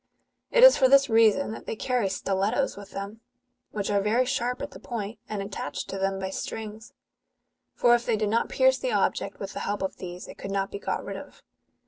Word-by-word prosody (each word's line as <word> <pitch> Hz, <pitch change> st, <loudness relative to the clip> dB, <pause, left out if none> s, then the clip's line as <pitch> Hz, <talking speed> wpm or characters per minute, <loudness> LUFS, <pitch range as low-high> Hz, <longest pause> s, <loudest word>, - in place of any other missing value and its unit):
It -, -, +4 dB
is -, -, +10 dB
for 260 Hz, -2 st, +5 dB
this 275 Hz, -2 st, +5 dB
reason 225 Hz, +3 st, +4 dB
that 220 Hz, -, -9 dB
they -, -, -3 dB
carry 245 Hz, -3 st, 0 dB
stilettos 195 Hz, +7 st, 0 dB
with 200 Hz, -1 st, -10 dB
them,"' 200 Hz, +3 st, -7 dB, 0.5 s
which 205 Hz, -1 st, -3 dB
are 200 Hz, -1 st, +2 dB
very 225 Hz, +5 st, +2 dB
sharp 245 Hz, 0 st, -1 dB
at 285 Hz, -, -6 dB
the -, -, -11 dB
point, 225 Hz, -3 st, -5 dB
and 205 Hz, -2 st, -3 dB
attached 195 Hz, -7 st, -5 dB
to 195 Hz, -, -4 dB
them 195 Hz, 0 st, 0 dB
by 190 Hz, 0 st, -4 dB
strings; 220 Hz, +3 st, -6 dB, 0.8 s
for 240 Hz, -, +4 dB
if 240 Hz, 0 st, +1 dB
they 235 Hz, -, +3 dB
did 210 Hz, -1 st, 0 dB
not 230 Hz, +2 st, +1 dB
pierce 260 Hz, 0 st, +3 dB
the 250 Hz, -, -2 dB
object 200 Hz, 0 st, 0 dB
with 195 Hz, 0 st, -6 dB
the -, -, -5 dB
help 205 Hz, -1 st, -2 dB
of 190 Hz, -, -3 dB
these, 180 Hz, -1 st, -8 dB
it -, -, -12 dB
could 195 Hz, -, -6 dB
not 195 Hz, 0 st, -1 dB
be 200 Hz, -, -5 dB
got -, -, -3 dB
rid -, -, -5 dB
of. -, -, -12 dB
215 Hz, 220 wpm, -27 LUFS, 195-245 Hz, 0.8 s, is